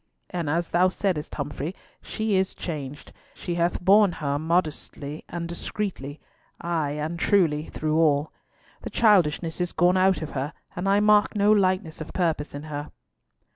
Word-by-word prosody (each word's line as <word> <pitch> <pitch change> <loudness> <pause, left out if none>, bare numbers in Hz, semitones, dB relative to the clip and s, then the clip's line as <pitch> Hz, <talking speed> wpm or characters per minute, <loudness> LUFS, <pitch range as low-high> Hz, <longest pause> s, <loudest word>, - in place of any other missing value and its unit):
And 170 -5 -2
as 170 +2 0
thou 180 +2 +4
saidst, 185 -5 -2
Humfrey, 145 +4 -4 0.3
she 220 -2 -2
is 190 0 +1
changed. 145 -4 -6 0.2
She 175 - -4
hath 170 0 0
borne 195 +1 +5
her 145 -2 -2
modestly 155 -2 -2
and 170 -1 -4
discreetly, 170 -4 -5 0.4
ay 160 -4 -1
and 155 +3 -4
truly, 165 -6 +2
through 155 0 -1
all. 150 -2 +2 0.5
The - - -6
childishness 180 -6 +2
is 175 - -2
gone 175 +2 +3
out 185 -2 +3
of 155 - -6
her, 140 +3 -3 0.2
and 180 +2 -1
I 200 +1 +4
mark 210 +1 +4
no 205 0 +4
lightness 185 -6 +1
of 155 - -7
purpose 160 -5 -1
in 145 - -6
her." 150 -1 -6
170 Hz, 160 wpm, -25 LUFS, 150-185 Hz, 0.5 s, borne